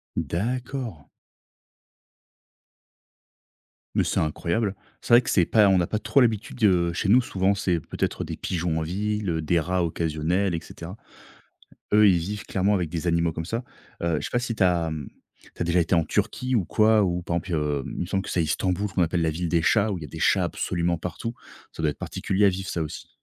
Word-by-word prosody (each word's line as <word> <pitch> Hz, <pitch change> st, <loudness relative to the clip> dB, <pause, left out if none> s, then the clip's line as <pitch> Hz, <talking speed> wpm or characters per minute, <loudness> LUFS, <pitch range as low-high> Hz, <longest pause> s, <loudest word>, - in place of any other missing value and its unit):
D'accord. 115 Hz, -, -3 dB, 2.9 s
Mais -, -, +3 dB
c'est -, -, 0 dB
incroyable. 95 Hz, +7 st, -1 dB, 0.3 s
C'est -, -, 0 dB
vrai 120 Hz, -, +9 dB
que -, -, -5 dB
c'est 90 Hz, -, +4 dB
pas 105 Hz, 0 st, +5 dB
on 95 Hz, -1 st, +4 dB
a 85 Hz, -, 0 dB
pas 105 Hz, -, -1 dB
trop 140 Hz, -, +2 dB
l'habitude, 115 Hz, -1 st, 0 dB
heu, 90 Hz, -3 st, +3 dB
chez 90 Hz, -, -2 dB
nous, 120 Hz, +6 st, +6 dB
souvent, 95 Hz, -3 st, +1 dB
c'est 90 Hz, -3 st, 0 dB
peut-être -, -, -3 dB
des -, -, -5 dB
pigeons 85 Hz, -2 st, -2 dB
en -, -, -2 dB
ville, 105 Hz, +4 st, -2 dB
heu, 80 Hz, -1 st, -1 dB
des 85 Hz, +2 st, +2 dB
rats 90 Hz, +2 st, 0 dB
occasionnels, 85 Hz, +4 st, 0 dB
et 85 Hz, -, -1 dB
cetera. 85 Hz, +4 st, -9 dB, 1.0 s
Eux, 105 Hz, 0 st, +7 dB
ils 90 Hz, -, +5 dB
vivent 100 Hz, +5 st, -4 dB
clairement 100 Hz, +2 st, +1 dB
avec 90 Hz, -4 st, 0 dB
des 85 Hz, +2 st, -4 dB
animaux 85 Hz, -1 st, +2 dB
comme 80 Hz, 0 st, -4 dB
ça. 115 Hz, +8 st, -3 dB, 0.4 s
Heu, 85 Hz, -2 st, +1 dB
je -, -, -6 dB
sais -, -, -4 dB
pas 120 Hz, -, +2 dB
si 120 Hz, -1 st, -2 dB
tu 100 Hz, -, +1 dB
as, 85 Hz, -3 st, +2 dB
mmh, 75 Hz, -3 st, -5 dB, 0.5 s
tu -, -, -3 dB
as -, -, 0 dB
déjà 85 Hz, +1 st, +2 dB
été 85 Hz, +2 st, +1 dB
en 85 Hz, -1 st, +3 dB
Turquie 125 Hz, +10 st, -1 dB
ou 105 Hz, -6 st, +2 dB
quoi, 110 Hz, +3 st, +4 dB
ou 90 Hz, -2 st, 0 dB
par 85 Hz, 0 st, -2 dB
exemple? 85 Hz, +2 st, -3 dB
Heu, 75 Hz, -3 st, -1 dB
il -, -, -6 dB
me 90 Hz, -, -1 dB
semble 95 Hz, +1 st, -1 dB
que -, -, -7 dB
c'est 85 Hz, -, +1 dB
Istanbul 90 Hz, +6 st, 0 dB
qu'on 90 Hz, -1 st, 0 dB
appelle 85 Hz, 0 st, +1 dB
la 80 Hz, -, +2 dB
ville 85 Hz, +2 st, -3 dB
des 85 Hz, -2 st, +2 dB
chats, 110 Hz, +2 st, +3 dB
où 90 Hz, -, -3 dB
il -, -, -10 dB
y -, -, -5 dB
a -, -, -15 dB
des -, -, -8 dB
chats -, -, +3 dB
absolument 85 Hz, -1 st, -1 dB
partout. 90 Hz, +8 st, -5 dB, 0.4 s
Ça -, -, -7 dB
doit 75 Hz, -, +3 dB
être -, -, -10 dB
particulier 100 Hz, +1 st, 0 dB
à -, -, +7 dB
vivre, 95 Hz, 0 st, -3 dB
ça 85 Hz, -, -2 dB
aussi. 75 Hz, -, -7 dB
90 Hz, 225 wpm, -25 LUFS, 85-105 Hz, 2.9 s, vrai